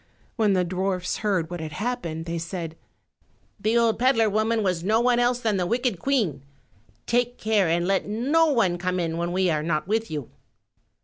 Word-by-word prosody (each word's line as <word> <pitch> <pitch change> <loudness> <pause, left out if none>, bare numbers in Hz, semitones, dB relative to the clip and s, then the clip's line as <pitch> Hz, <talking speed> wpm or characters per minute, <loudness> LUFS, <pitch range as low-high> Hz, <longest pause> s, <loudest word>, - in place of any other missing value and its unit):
When 215 -3 +2
the 185 -1 +2
dwarfs 185 0 -2
heard 185 -6 -1
what 175 - -4
had 155 -1 -6
happened 170 -6 -3
they 170 0 -3
said, 165 -1 -5 0.8
"The 220 +3 +1
old 230 -1 +2
peddler 230 -4 +3
woman 220 +1 +1
was 180 -3 0
no 215 +4 +2
one 240 0 +3
else 245 0 +2
than 220 -4 0
the 180 -1 0
wicked 235 -4 0
Queen; 210 - 0 0.6
take 245 +1 0
care 215 -4 +2
and 170 +1 +1
let 195 +1 0
no 275 +10 +2
one 205 - +2
come 185 0 -1
in 165 -1 -2
when 170 +1 -2
we 185 -1 +1
are 155 -1 0
not 155 0 -1
with 220 +2 0
you." 150 -5 -5
195 Hz, 190 wpm, -25 LUFS, 170-230 Hz, 0.8 s, peddler